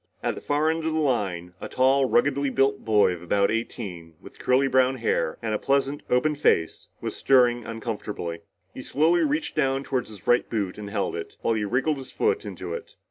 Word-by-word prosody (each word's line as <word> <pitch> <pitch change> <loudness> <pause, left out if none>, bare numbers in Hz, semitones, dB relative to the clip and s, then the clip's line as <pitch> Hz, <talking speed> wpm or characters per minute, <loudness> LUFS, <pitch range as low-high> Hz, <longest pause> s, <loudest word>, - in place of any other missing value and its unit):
At - - 0
the - - -9
far 150 +2 +1
end 165 0 -3
of 160 0 -1
the - - +1
line, 95 - -1
a - - -6
tall, 130 +1 +3
ruggedly 140 0 +2
built 135 +1 +1
boy 105 -4 +3
of 85 - -8
about 100 +4 +1
eighteen, 95 -8 -5
with - - -15
curly 130 +2 +3
brown 130 0 +3
hair 115 -8 0
and 110 -1 -1
a 105 - 0
pleasant, 140 +1 0
open 125 +5 +2
face, 85 - +1
was - - -4
stirring 120 -3 +3
uncomfortably. 105 -7 -5 0.3
He - - -7
slowly 165 +4 +2
reached 300 +1 -1
down 135 -2 +1
toward 130 -4 -2
his 105 -5 -11
right 120 - +3
boot 105 -4 -2
and 105 -1 -6
held 100 -1 -2
it, - - -7
while 115 - +2
he 110 -2 -1
wriggled 135 +8 0
his 135 -1 -9
foot 435 -1 0
into - - -6
it. 470 -2 -8
125 Hz, 205 wpm, -25 LUFS, 105-140 Hz, 0.3 s, tall